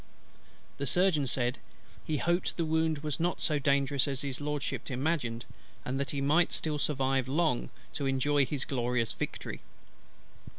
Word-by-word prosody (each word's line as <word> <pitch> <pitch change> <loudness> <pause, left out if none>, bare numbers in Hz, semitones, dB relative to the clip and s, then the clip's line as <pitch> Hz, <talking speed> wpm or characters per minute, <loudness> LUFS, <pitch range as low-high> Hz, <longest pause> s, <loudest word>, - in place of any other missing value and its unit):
The 140 - -1
Surgeon 175 -3 +3
said, 125 0 0 0.4
"he 155 - -1
hoped 175 +4 0
the 165 - +1
wound 160 -1 +1
was 150 -1 -2
not 175 +2 0
so 150 -2 +1
dangerous 140 -1 +2
as 135 -2 -2
His 140 -1 -3
LORDSHIP 150 0 -2
imagined, 130 -4 -1 0.4
and 130 +2 -2
that 140 -1 -1
he 140 0 -2
might 155 +5 +3
still 150 -2 0
survive 135 -3 +1
long 150 -2 +1 0.2
to 140 +4 -2
enjoy 135 +1 +2
his 140 -3 -2
glorious 125 -3 0
victory." - - -5
140 Hz, 155 wpm, -31 LUFS, 130-155 Hz, 0.4 s, Surgeon